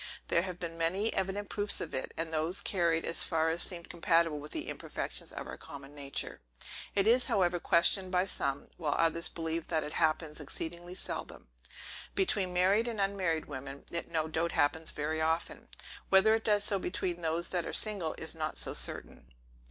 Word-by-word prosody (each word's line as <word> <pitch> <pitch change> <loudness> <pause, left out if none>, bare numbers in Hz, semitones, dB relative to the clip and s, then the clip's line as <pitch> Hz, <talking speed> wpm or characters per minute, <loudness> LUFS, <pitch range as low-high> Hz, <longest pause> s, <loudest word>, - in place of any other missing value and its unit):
There 170 - +4
have 180 -1 -5
been 165 -1 -6
many 190 +7 +1
evident 195 +2 -2
proofs 205 0 +1
of 160 - -5
it, 130 - -2
and 165 0 -3
those 160 +5 +2
carried 170 -4 +1
as 165 - +1
far 160 -1 +1
as 165 +1 -1
seemed 170 -2 -3
compatible 165 -2 +2
with 150 +1 -9
the - - -4
imperfections - - -3
of - - -6
our - - -7
common 140 0 -10
nature. 140 - -3 0.5
It 200 -1 +4
is, 240 +3 +5
however, 180 -2 +2
questioned 185 +3 +3
by 180 0 +2
some; 140 -7 -1
while 150 -4 -1
others 165 0 +5
believe 165 0 -3
that 160 -2 0
it 150 - -5
happens 155 -1 0
exceedingly 170 +4 -4
seldom. - - -4 0.7
Between 190 -1 +2
married 190 +6 +3
and 230 -3 -3
unmarried 190 -5 0
women, 135 0 -7
it 170 - -3
no 160 -2 0
doubt 165 +2 -1
happens 160 +1 +2
very 155 +2 -1
often; 160 +1 -1 0.4
whether 195 +3 +6
it 220 0 0
does 210 -2 +3
so 200 -1 +3
between 180 -1 -2
those 165 +1 +1
that 175 -2 -1
are - - -3
single, 200 -7 +2
is 160 - -2
not 155 -2 -4
so - - 0
certain. - - -2
170 Hz, 185 wpm, -32 LUFS, 160-190 Hz, 0.7 s, whether